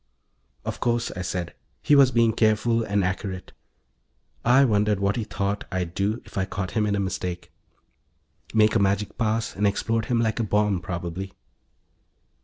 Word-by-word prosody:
"Of - - -4
course," 120 -1 0
I 90 - -4
said. 90 -1 -3 0.3
He 145 - +5
was 140 -2 +7
being 115 -2 +3
careful 115 +1 +2
and 100 -2 0
accurate. 95 0 -3 0.9
I 130 +3 +5
wondered 105 -3 +2
what 100 0 +1
he 115 - -1
thought 100 -1 -3
I'd 90 -2 -2
do 105 +5 -1
if - - -5
I 95 - +1
caught 95 -2 -4
him 105 -2 +1
in 100 - +1
a - - -1
mistake. 90 -2 -4 1.0
Make 110 -1 +4
a 115 - +3
magic 100 +1 0
pass 115 +1 0
and 105 +1 +2
explode 115 +3 0
him 120 0 +1
like 110 0 0
a - - +1
bomb, 105 -2 +1
probably. 90 +2 -5
105 Hz, 170 wpm, -25 LUFS, 95-115 Hz, 1.0 s, was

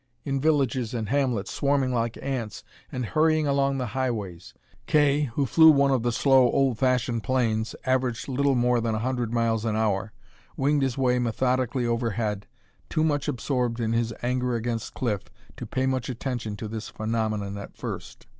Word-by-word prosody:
In 135 -2 -1
villages 130 -6 +1
and 110 -3 -3
hamlets, 125 -7 0
swarming 140 -2 +1
like 115 -1 -1
ants, 125 -6 -4 0.3
and 125 -1 -3
hurrying 155 +5 +2
along 140 -1 +1
the 130 - -2
highways! 105 -10 -3 0.3
Kay, 145 -1 +3
who 140 - +2
flew 160 +5 +7
one 140 -2 +5
of 130 -3 +2
the 120 +1 0
slow, 130 0 +4
old 135 -4 +1
fashioned 125 -3 +1
planes, 115 -3 0
averaging 130 0 0
little 140 0 +2
more 120 -1 +2
than 115 -1 -1
a 110 +2 -2
hundred 125 -3 -1
miles 115 -2 +1
an 110 -2 -1
hour, 110 -1 0 0.5
winged 145 +2 +2
his 135 -2 0
way 125 -2 +2
methodically 125 +1 0
overhead, 115 -3 -1 0.4
too 155 - +1
much 145 -3 0
absorbed 125 -1 -1
in 115 -1 0
his 115 0 0
anger 125 0 0
against 115 -1 -3
Cliff 105 -6 -2 0.3
to - - -7
pay 130 - -1
much 130 -2 -1
attention 120 -3 -4
to 110 - -6
this 110 0 -6
phenomenon 110 -2 -2
at 100 - -10
first. - - -7
125 Hz, 175 wpm, -26 LUFS, 115-135 Hz, 0.5 s, flew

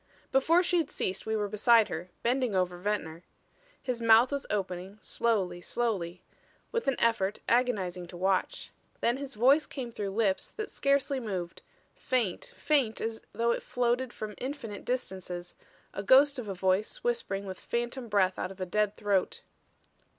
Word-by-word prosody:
Before 320 +7 +4
she 350 0 +2
had 310 -3 -1
ceased 185 +3 -3
we 220 - 0
were 210 -1 0
beside 220 +2 +4
her; 170 +3 -5
bending 245 -3 +1
over 180 -1 0
Ventnor. 175 -5 -2 0.6
His 250 -3 -2
mouth 230 +3 +6
was 280 -1 -3
opening, 190 -1 -3
slowly, 195 -7 0
slowly 185 -5 -2 0.5
with 465 -7 -2
an 270 - +3
effort 215 -3 +2
agonizing 195 -8 +1
to 175 - -10
watch. 190 +1 0 0.3
Then 240 +2 +2
his 275 -3 -6
voice 270 +7 +4
came 250 -4 -6
through 205 -3 -3
lips 195 -1 0
that 430 -1 -5
scarcely 275 -1 +1
moved; 185 -7 -4 0.3
faint, 240 -9 -1
faint 270 -8 +1
as 225 0 -3
though 235 0 +1
it - - -1
floated 245 +1 0
from 215 -2 -6
infinite 255 -6 -5
distances, 185 -8 -4 0.4
a - - -3
ghost 270 +6 +5
of 230 - -6
a 195 - -4
voice 190 - 0
whispering 470 - -1
with 190 -1 -6
phantom 240 +1 -3
breath 190 -3 +2
out - - -2
of 195 0 -11
a 185 - -2
dead 210 +2 0
throat. 200 -3 0
220 Hz, 165 wpm, -30 LUFS, 190-255 Hz, 0.6 s, mouth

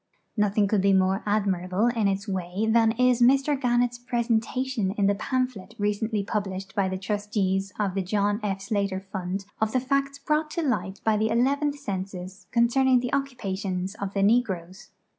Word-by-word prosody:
Nothing 210 -1 +2
could 200 -1 +2
be 195 0 +4
more 190 +1 +2
admirable 195 -1 +1
in 235 -4 +2
its 195 +2 -1
way 190 +1 -2
than 225 0 +4
is 250 0 +3
Mr 275 +4 +4
Gannett's 245 -2 +1
pre 240 -1 -1
sentation 230 -2 -1
in 200 - +2
the 200 - +4
pamphlet 230 -1 -3
recently 210 +1 -1
published 195 -2 -3
by 195 -3 +1
the 190 - -3
Trustees 195 -1 -1
of 200 -3 0
the 195 - 0
John 205 +2 0
F. 195 -2 -2
Slater 200 -2 -1
Fund 190 0 -5 0.2
of 220 0 +1
the 255 - +3
facts 275 +2 -1
brought 305 +2 0
to 335 - +1
light 220 -8 -1
by 220 -1 +2
the 220 +1 +1
Eleventh 280 +5 +1
Census 190 -5 -6
con 235 0 +4
cerning 260 +1 +3
the 245 0 -4
occupations 195 -9 -2
of 200 -2 -6
the 195 - +2
negroes. 195 -5 0
210 Hz, 180 wpm, -26 LUFS, 195-245 Hz, 0.2 s, be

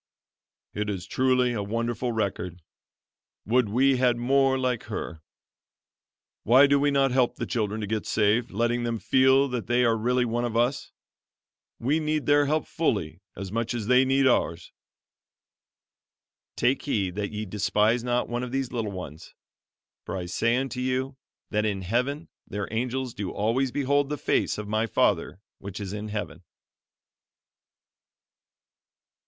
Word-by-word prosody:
"It 105 0 -2
is 95 -3 -4
truly 125 -1 +2
a 110 - -2
wonderful 115 +3 -2
record! 95 -5 -3 0.8
Would 120 0 +2
we 130 +4 +3
had 125 -1 +2
more 135 +2 +2
like 125 -3 -1
her. 85 -7 -6 1.2
Why 130 +5 +6
do 140 0 +3
we 145 +1 +2
not 135 -2 +2
help 125 -1 +2
the - - -4
children 110 -2 -2
to - - -2
get 110 +1 -3
saved, 110 +3 +2
letting 120 +3 0
them 115 -1 -1
feel 130 +4 +4
that 125 -3 -4
they 120 +1 +2
are 115 -1 +3
really 125 +3 +1
one 120 +1 -1
with 115 -1 -2
us? 120 +3 0 0.9
We 140 +7 +1
need 155 -1 -1
their 145 0 +4
help 155 +1 0
fully 95 - -2
as 95 0 -6
much 115 +2 -2
as 115 -3 -3
they 125 +3 +5
need 135 +1 +2
ours. 85 -9 +1 1.8
'Take 125 +3 +1
heed 100 -10 -1
that 100 +1 -3
ye 105 0 -4
despise 105 +3 +1
not 125 0 0
one 120 +1 -3
of 125 -1 -5
these 135 -1 -2
little 115 -4 -2
ones; 85 -5 -9 0.7
for - - -5
I 90 - -4
say 115 +6 +1
unto 130 -1 -3
you, 130 +1 -1 0.4
That 105 -1 +1
in 100 -3 -1
heaven 125 - -1 0.2
their 100 -1 -4
angels 125 +1 -2
do 100 -3 -4
always 120 +5 0
behold 140 +1 +1
the 150 - -2
face - - 0
of 105 -1 -5
my 110 +2 0
Father 90 - +1 0.2
which 100 +1 -7
is 100 -1 -5
in 105 0 -5
Heaven.'" 105 -6 -5
120 Hz, 155 wpm, -26 LUFS, 105-130 Hz, 1.8 s, Why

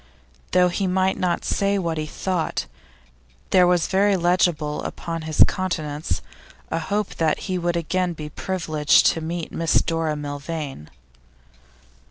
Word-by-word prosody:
Though 180 0 +5
he 190 +2 -1
might 190 +1 +1
not 175 -2 0
say 200 0 +1
what 165 -4 -1
he 155 - -3
thought, 180 +1 -2 0.9
there 180 -1 +6
was 175 -2 +3
very 195 +1 +3
legible 170 -4 +1
upon 165 -1 -5
his 155 - +6
countenance 150 - -3 0.5
a 165 - 0
hope 200 +5 -2
that 160 -2 +1
he 185 -2 -2
would 175 0 0
again 180 +2 0
be 155 -2 -7
privileged 155 -4 +2
to 165 - -5
meet 165 +1 -4
Miss 165 -1 +2
Dora 165 -2 -1
Milvain. 145 - -5
170 Hz, 140 wpm, -23 LUFS, 155-185 Hz, 0.9 s, there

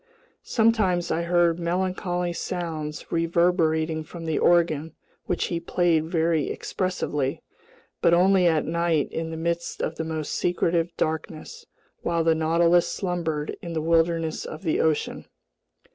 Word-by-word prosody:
Sometimes 215 -7 +2
I 165 - 0
heard 170 -1 +2
melancholy 180 0 -1
sounds 160 -4 -5
reverberating 165 -2 +1
from 165 +1 -9
the 160 -1 0
organ, 165 -3 +2 0.3
which 180 - 0
he 170 - 0
played 170 -2 +1
very 165 -2 +1
expressively, 150 -7 -2 0.6
but 170 - +4
only 180 +1 +4
at 160 -2 +2
night 170 -2 0
in 165 0 -3
the 160 - -5
midst 170 +1 -2
of 160 - -3
the 160 - -2
most 160 -2 -4
secretive 175 -1 +1
darkness, 160 - -4 0.3
while 170 -1 0
the 165 0 +4
Nautilus 170 +2 +3
slumbered 165 -5 -2
in 170 -1 -6
the 160 - -1
wilderness 165 0 +1
of 155 - -8
the 160 - 0
ocean. 155 -2 0
170 Hz, 135 wpm, -25 LUFS, 160-175 Hz, 0.6 s, but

